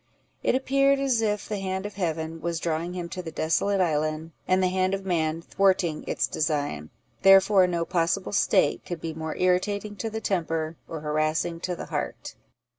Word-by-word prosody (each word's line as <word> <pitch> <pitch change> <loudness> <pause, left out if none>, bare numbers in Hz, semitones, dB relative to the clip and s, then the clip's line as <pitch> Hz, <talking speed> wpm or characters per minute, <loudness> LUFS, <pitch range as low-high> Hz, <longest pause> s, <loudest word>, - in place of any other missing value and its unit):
It - - +2
appeared 275 +1 +3
as 265 -4 +1
if 210 -2 -1
the 210 -2 -3
hand 190 0 -3
of 205 - -5
Heaven 165 -3 -3
was 170 -1 -2
drawing 165 +1 -2
him 175 -2 -4
to 185 - -5
the 170 - -6
desolate 195 +6 +1
island, 155 -1 0 0.2
and 185 0 +3
the - - +4
hand 185 +1 +1
of 195 0 -7
man 165 -2 0
thwarting 185 -6 +1
its 120 - +1
design; 145 - -2 0.3
therefore 195 0 +6
no 170 -2 -1
possible 170 +3 0
state 195 -1 +2
could 175 -2 -5
be 160 0 -4
more 160 0 -5
irritating 200 +3 0
to 225 - -3
the 220 0 -4
temper, 165 -5 -1
or 160 -2 -6
harassing 155 +3 0
to 180 +1 -3
the - - -6
heart. - - -4
175 Hz, 185 wpm, -26 LUFS, 160-195 Hz, 0.3 s, therefore